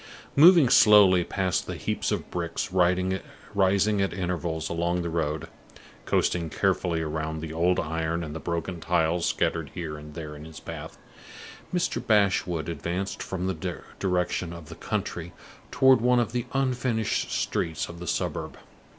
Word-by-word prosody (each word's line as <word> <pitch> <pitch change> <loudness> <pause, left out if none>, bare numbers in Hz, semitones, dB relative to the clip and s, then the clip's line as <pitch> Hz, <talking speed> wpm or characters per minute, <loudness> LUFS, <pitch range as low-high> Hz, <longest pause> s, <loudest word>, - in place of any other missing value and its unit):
Moving 165 -1 +8
slowly 105 -6 +7
past 95 0 -1
the - - -4
heaps - - -2
of - - -3
bricks 85 +1 -3
rising 90 0 +2 0.9
at 95 - 0
intervals 85 -3 -2
along 85 +1 -1
the 85 - -3
road, 80 -2 -2 0.6
coasting 85 -2 +1
carefully 80 +1 0
round 80 0 -3
the 80 0 -6
old 85 +2 +2
iron 80 +1 -2
and 75 -1 -6
the - - -4
broken 85 +3 -3
tiles 85 0 +1
scattered - - 0
here 75 -3 -5
and 75 0 -11
there 75 -3 -6
in 75 +1 -10
his 80 0 -10
path, - - -8 0.7
Mr. 170 -9 -1
Bashwood 95 - +2
advanced 85 +4 -3
from 95 -1 -4
the 90 -1 -3 0.2
direction 90 -2 -1
of 85 -3 -10
the - - -8
country - - -4 0.4
toward 130 -3 +5
one 125 +1 +4
of 115 -2 0
the 120 0 -2
unfinished 125 -4 0
streets 80 -3 -1
of 85 0 -10
the 90 - -7
suburb. - - -2
85 Hz, 150 wpm, -26 LUFS, 80-95 Hz, 0.9 s, Moving